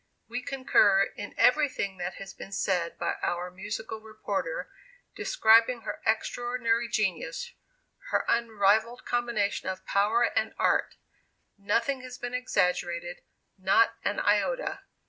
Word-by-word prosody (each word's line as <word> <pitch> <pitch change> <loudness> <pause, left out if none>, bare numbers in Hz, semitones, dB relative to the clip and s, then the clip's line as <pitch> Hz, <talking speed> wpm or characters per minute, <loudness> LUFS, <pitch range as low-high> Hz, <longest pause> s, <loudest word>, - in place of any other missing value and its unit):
"We 245 +2 -4
concur 250 -7 +3
in 205 - -7
everything 250 -8 +2
that 175 +1 -4
has 195 0 -9
been 195 - -10
said 180 -3 -1
by - - -2
our 175 +1 -2
musical 210 +4 -6
reporter, 220 - -4 0.5
describing 230 - +4
her - - -6
extraordinary 235 +1 0
genius 185 -6 -2 0.6
her - - +1
unrivalled 225 0 +2
combination 235 -6 -1
of 185 0 -6
power 210 +4 +2
and - - 0
art. - - +1 0.6
Nothing 235 +7 0
has 255 0 -9
been 245 0 -5
exaggerated, 175 -7 -1 0.4
not 200 +5 +4
an 205 - 0
iota. 355 - +1
220 Hz, 120 wpm, -28 LUFS, 195-240 Hz, 0.6 s, describing